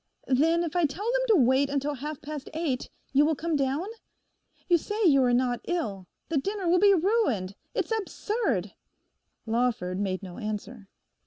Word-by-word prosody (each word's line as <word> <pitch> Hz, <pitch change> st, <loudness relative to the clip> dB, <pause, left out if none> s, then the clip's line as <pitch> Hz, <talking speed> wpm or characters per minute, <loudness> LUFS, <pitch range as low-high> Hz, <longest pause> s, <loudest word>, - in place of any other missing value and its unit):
'Then 325 Hz, +6 st, +3 dB
if 335 Hz, 0 st, -4 dB
I 350 Hz, -2 st, +3 dB
tell 305 Hz, +9 st, -4 dB
them -, -, +2 dB
to 445 Hz, -, +5 dB
wait 265 Hz, +3 st, +3 dB
until 285 Hz, +1 st, -1 dB
half 290 Hz, +2 st, -6 dB
past 295 Hz, -2 st, -6 dB
eight, 300 Hz, -6 st, -2 dB, 0.2 s
you 280 Hz, +2 st, +5 dB
will 315 Hz, +1 st, +2 dB
come 325 Hz, +2 st, -2 dB
down? 275 Hz, +4 st, 0 dB, 0.8 s
You 345 Hz, -2 st, +4 dB
say 425 Hz, +6 st, -3 dB
you 275 Hz, -6 st, +6 dB
are 250 Hz, -1 st, +3 dB
not 245 Hz, -1 st, +1 dB
ill: 205 Hz, -, -3 dB, 0.2 s
the 320 Hz, -4 st, +1 dB
dinner 395 Hz, +4 st, -3 dB
will 355 Hz, +1 st, +4 dB
be 405 Hz, +1 st, +6 dB
ruined. 325 Hz, -, +1 dB, 0.2 s
It's -, -, -1 dB
absurd.' 400 Hz, -, -2 dB, 0.7 s
Lawford 225 Hz, -6 st, 0 dB
made 195 Hz, -1 st, -2 dB
no 180 Hz, -2 st, -8 dB
answer. 215 Hz, 0 st, -6 dB
285 Hz, 170 wpm, -27 LUFS, 240-345 Hz, 0.8 s, you